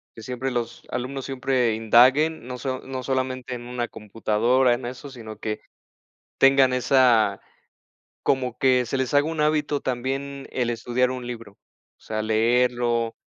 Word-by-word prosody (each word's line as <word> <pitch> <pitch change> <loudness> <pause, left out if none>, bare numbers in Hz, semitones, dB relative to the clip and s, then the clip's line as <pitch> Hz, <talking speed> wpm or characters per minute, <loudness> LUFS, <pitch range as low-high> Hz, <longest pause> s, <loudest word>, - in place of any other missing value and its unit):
que 115 - -10
siempre 130 +2 -3
los 120 -1 -4
alumnos 130 +2 -4
siempre 130 -3 0
indaguen 125 +7 +4
no 125 0 -5
so 130 +1 -3
no 130 -1 -6
solamente 130 -1 -2
en 120 -1 -6
una 120 -1 -3
computadora 115 +4 +1
en 120 0 -4
eso, 130 +3 -7
sino 110 -5 -10
que 105 -1 -3 0.8
tengan 135 -1 +5
esa 125 -5 +3 0.8
como 125 -3 0
que 130 -2 +3
se 135 +4 -2
les 130 0 -2
haga 145 +1 +4
un 160 -2 -2
hábito 150 -1 +1
también 135 +2 -3
el 120 -2 -1
estudiar 120 +2 0
un 125 -1 -6
libro, 115 -4 -8 0.4
o - - -38
sea, 110 0 -3
leerlo, 120 +1 +1
125 Hz, 155 wpm, -24 LUFS, 120-130 Hz, 0.8 s, tengan